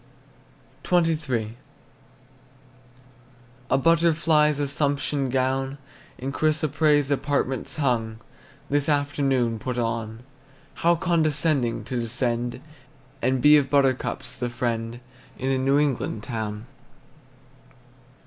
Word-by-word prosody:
XXIII. 145 Hz, -10 st, 0 dB, 2.1 s
The -, -, +3 dB
butterfly's 160 Hz, -1 st, +3 dB
assumption 140 Hz, -1 st, -1 dB
gown, 135 Hz, +1 st, -1 dB, 0.4 s
In 135 Hz, +2 st, -4 dB
chrysoprase 150 Hz, -1 st, +1 dB
apartments 140 Hz, -2 st, -1 dB
hung, 115 Hz, -7 st, 0 dB, 0.5 s
This 145 Hz, +1 st, 0 dB
afternoon 135 Hz, -5 st, +1 dB
put 125 Hz, +2 st, -4 dB
on. 115 Hz, -1 st, -3 dB, 0.6 s
How 170 Hz, +1 st, +4 dB
condescending 155 Hz, -7 st, +1 dB
to 125 Hz, -2 st, -3 dB
descend, 120 Hz, +1 st, -2 dB, 0.6 s
And 130 Hz, 0 st, 0 dB
be 150 Hz, 0 st, +8 dB
of 140 Hz, -2 st, +1 dB
buttercups 135 Hz, -3 st, 0 dB
the 125 Hz, -1 st, -4 dB
friend 120 Hz, 0 st, -3 dB, 0.4 s
In 130 Hz, +1 st, -1 dB
a 130 Hz, -, +1 dB
New 135 Hz, +2 st, +2 dB
England 135 Hz, -7 st, -1 dB
town! 110 Hz, -2 st, -4 dB
135 Hz, 90 wpm, -24 LUFS, 120-150 Hz, 2.1 s, be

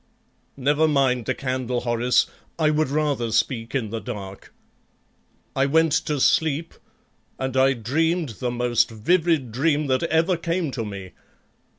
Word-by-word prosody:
"Never 145 Hz, +4 st, +2 dB
mind 135 Hz, -5 st, +1 dB
the 130 Hz, -, 0 dB
candle, 130 Hz, -2 st, -2 dB
Horace; 120 Hz, +1 st, +2 dB, 0.3 s
I 155 Hz, -2 st, +3 dB
would 155 Hz, -1 st, +1 dB
rather 140 Hz, -6 st, 0 dB
speak 115 Hz, +3 st, -1 dB
in 115 Hz, -6 st, -1 dB
the 115 Hz, -, -3 dB
dark. 95 Hz, -1 st, -8 dB, 1.0 s
I 135 Hz, +1 st, +2 dB
went 160 Hz, +2 st, +3 dB, 0.2 s
to 150 Hz, -2 st, -1 dB
sleep, 160 Hz, +4 st, +1 dB, 0.6 s
and 130 Hz, -1 st, -3 dB
I 135 Hz, +1 st, +4 dB
dreamed 160 Hz, +7 st, 0 dB
the 125 Hz, -, -1 dB
most 120 Hz, -1 st, +1 dB
vivid 155 Hz, +3 st, +1 dB
dream 145 Hz, +5 st, +1 dB
that 130 Hz, -2 st, +1 dB
ever 165 Hz, +2 st, +2 dB
came 170 Hz, -2 st, -2 dB
to 120 Hz, -3 st, -3 dB
me. 100 Hz, -3 st, -7 dB
135 Hz, 145 wpm, -23 LUFS, 120-155 Hz, 1.0 s, I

